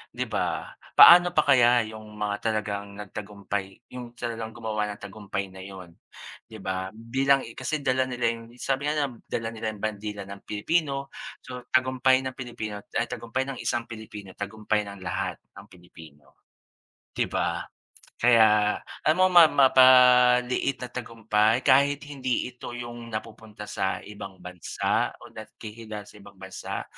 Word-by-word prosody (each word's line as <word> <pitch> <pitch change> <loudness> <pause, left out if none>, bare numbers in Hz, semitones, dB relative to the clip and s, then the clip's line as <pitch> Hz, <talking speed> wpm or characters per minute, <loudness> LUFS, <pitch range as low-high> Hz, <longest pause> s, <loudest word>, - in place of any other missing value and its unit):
'di - - -2
ba? - - -2 0.2
Paano 175 0 +10
pa 155 - +4
kaya 125 -4 +5
yung 110 -1 -11
mga 105 -1 -1
talagang 100 -2 -3
nagtagumpay 100 0 -6
yung 120 -1 -8
talagang 115 -2 -5
gumawa 110 -2 -2
ng 105 - -8
tagumpay 100 -1 -5
na 95 - -11
'yon 95 -3 -10 0.6
'di 110 - -10
ba? 95 0 -2
Bilang 135 +4 +1
kasi 140 +3 -3
dala 130 -1 +1
nila 120 -2 0
yung 115 +1 -10
sabi 135 +3 -1
nga 155 - -1
nila 140 -2 0
na 115 - -15
dala 115 -1 -3
nila 110 0 -5
yung 100 - -14
bandila 105 -1 -4
ng 100 0 -10
Pilipino 140 +5 -1 0.3
so, 125 -1 -9
tagumpay 130 0 +3
ng 130 - -3
Pilipino 110 -5 -6 0.2
ay, 115 - +1
tagumpay 125 +3 -3
ng 135 -2 -6
isang 120 0 -1
Pilipino, 105 -4 -10
tagumpay 105 +1 -2
ng 100 -2 -10
lahat 85 - -2 0.2
ng - - -12
Pilipino, 80 -4 -17 0.7
'di - - +1
ba? - - -1 0.6
Kaya, 110 -3 +5 0.3
ano 185 +4 +4
ma 170 -3 +9
mapaliit 125 -1 +5
na 125 - -7
tagumpay 115 -1 0
kahit 140 +2 +4
hindi 130 -3 -2
ito 120 0 -9
yung 120 -1 -7
napupunta 110 -1 -8
sa 95 -2 -3
ibang 100 -2 -10
bansa 90 -1 -2
o - - -13
nakikilala 110 -1 -9
sa 105 - -17
ibang 100 0 -15
bansa, 95 0 -6
115 Hz, 150 wpm, -26 LUFS, 105-130 Hz, 0.7 s, Paano